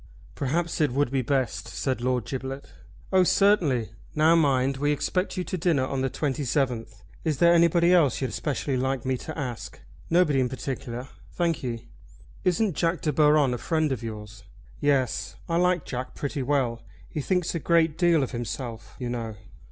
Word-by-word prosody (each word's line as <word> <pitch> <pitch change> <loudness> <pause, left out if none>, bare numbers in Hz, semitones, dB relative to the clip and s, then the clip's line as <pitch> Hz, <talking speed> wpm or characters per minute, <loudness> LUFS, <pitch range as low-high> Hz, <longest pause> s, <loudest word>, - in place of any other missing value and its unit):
"Perhaps 160 +5 -1
it 150 - +4
would 140 -1 +1
be 135 -1 +1
best," 130 0 -1
said 130 -3 -2
Lord 125 -2 0
Giblet. 135 +2 -5 0.5
"Oh, 185 -1 +6
certainly. 170 - +3 0.2
Now 155 +2 +5
mind, 135 -4 +2
we 145 +2 +1
expect 180 +7 -1
you 180 - 0
to 185 - -4
dinner 160 -6 +2
on 130 0 -2
the 135 - 0
27th. 125 -6 -2 0.2
Is 155 -4 0
there 170 +3 +5
anybody 170 +1 +4
else 155 -9 +4
you'd 130 - -2
specially 140 -2 -2
like 130 -1 -1
me 130 0 +1
to 155 +5 -7
ask?" 125 -6 -5 0.3
"Nobody 165 -5 +3
in 125 -1 +1
particular, 130 -1 -5 0.3
thank 170 -2 0
ye." 120 -2 -5 0.6
"Isn't 185 0 +1
Jack 165 -1 0
De 150 - 0
Baron 150 -3 +4
a 120 - -3
friend 155 -3 0
of 130 - -2
yours?" 105 -1 -8 0.4
"Yes, 140 -5 0
I 165 - 0
like 180 -2 +2
Jack 125 0 -5
pretty 140 -1 -3
well. 125 -4 0 0.3
He 150 - -4
thinks 180 +3 0
a 170 - -1
great 165 -1 +3
deal 170 -4 +3
of 130 - -4
himself, 115 -1 -5
you 125 - -4
know." 115 -2 -4
140 Hz, 175 wpm, -26 LUFS, 125-165 Hz, 0.6 s, Oh